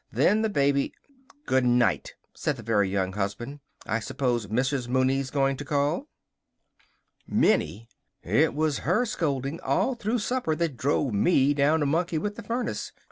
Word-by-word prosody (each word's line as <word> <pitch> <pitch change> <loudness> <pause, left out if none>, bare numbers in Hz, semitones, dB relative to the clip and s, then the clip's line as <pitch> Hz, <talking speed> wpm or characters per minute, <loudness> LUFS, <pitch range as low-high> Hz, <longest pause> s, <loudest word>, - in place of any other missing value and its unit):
Then 210 +3 +3
the 220 - +1
baby 140 -6 +1 0.3
" 275 +2 -29
"Good 130 0 +2
night!" 120 -1 +2 0.2
said 145 - -2
the 120 - -9
Very 105 -3 +2
Young 95 -1 -1
Husband. 110 +8 -4 0.3
"I 110 - 0
suppose 120 -2 -1
Mrs. 125 +4 0
Mooney's 130 +1 +1
going 135 -1 +1
to 145 - -5
call?" 145 +1 0 1.2
"Minnie! 100 +9 +1 0.4
It 140 - +2
was 155 -1 0
her 185 - +1
scolding 145 - -2
all 265 - +1
through 235 0 -1
supper 245 -7 -1
that 165 -3 -1
drove 135 -1 0
me 140 - +3
down 150 +3 +2
to - - +2
monkey 165 +3 0
with 205 +6 -2
the 230 - -7
furnace. 235 +4 -3
140 Hz, 160 wpm, -26 LUFS, 125-165 Hz, 1.2 s, Then